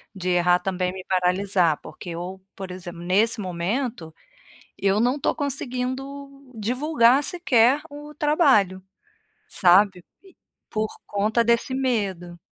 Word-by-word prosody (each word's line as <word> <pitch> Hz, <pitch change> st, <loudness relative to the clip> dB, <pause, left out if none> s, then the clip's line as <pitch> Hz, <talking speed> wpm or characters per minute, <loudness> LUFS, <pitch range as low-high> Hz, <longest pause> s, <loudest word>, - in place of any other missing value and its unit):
de 185 Hz, -1 st, -3 dB
errar 180 Hz, 0 st, +3 dB
também 185 Hz, -1 st, -2 dB
me 185 Hz, -1 st, -8 dB
paralisar, 180 Hz, -2 st, +1 dB
porque 180 Hz, -, -10 dB
eu, 180 Hz, +3 st, -6 dB
por 190 Hz, -2 st, -7 dB
exemplo 175 Hz, -2 st, -8 dB
nesse 210 Hz, +6 st, +1 dB
momento, 185 Hz, -, -3 dB, 0.6 s
eu 200 Hz, +1 st, +1 dB
não 250 Hz, +5 st, +1 dB
tô -, -, 0 dB
conseguindo 275 Hz, 0 st, -5 dB
divulgar 250 Hz, +3 st, +2 dB
sequer 280 Hz, -6 st, +3 dB
o 295 Hz, +1 st, -11 dB
trabalho, 265 Hz, -, +2 dB, 0.7 s
sabe, 185 Hz, 0 st, +3 dB, 0.6 s
por 215 Hz, 0 st, -2 dB, 0.2 s
conta 215 Hz, +3 st, +1 dB
desse 235 Hz, +3 st, +1 dB
medo. 195 Hz, -10 st, -2 dB
210 Hz, 115 wpm, -24 LUFS, 185-260 Hz, 0.7 s, errar